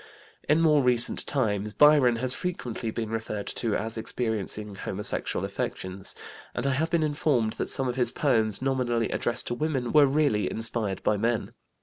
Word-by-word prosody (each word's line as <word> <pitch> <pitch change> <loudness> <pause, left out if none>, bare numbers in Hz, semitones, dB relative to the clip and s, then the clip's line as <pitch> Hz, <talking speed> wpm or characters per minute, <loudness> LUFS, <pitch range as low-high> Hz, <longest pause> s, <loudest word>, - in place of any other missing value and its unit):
In 155 +2 +4
more 155 -3 +4
recent 125 -2 +4
times 105 -6 -1
Byron 145 -4 +5
has 125 +2 +2
frequently 125 -11 -4
been 110 0 -4
referred 110 -2 -4
to 115 -4 -2
as 110 0 -3
experiencing 110 -3 -3
homosexual 100 +1 -3
affections, 95 0 -5 0.4
and - - -3
I 140 - +2
have 155 +5 0
been 165 -2 +1
informed 145 -7 0
that - - -2
some 135 - -1
of 125 +1 -3
his 120 -2 +1
poems 115 -6 +1
nominally 125 -4 0
addressed 120 0 0
to - - -1
women 130 -3 -2
were 150 -2 +6
really 135 -7 +1
inspired 110 -4 0
by 105 - +2
men. 115 +1 -1
120 Hz, 165 wpm, -26 LUFS, 110-140 Hz, 0.4 s, were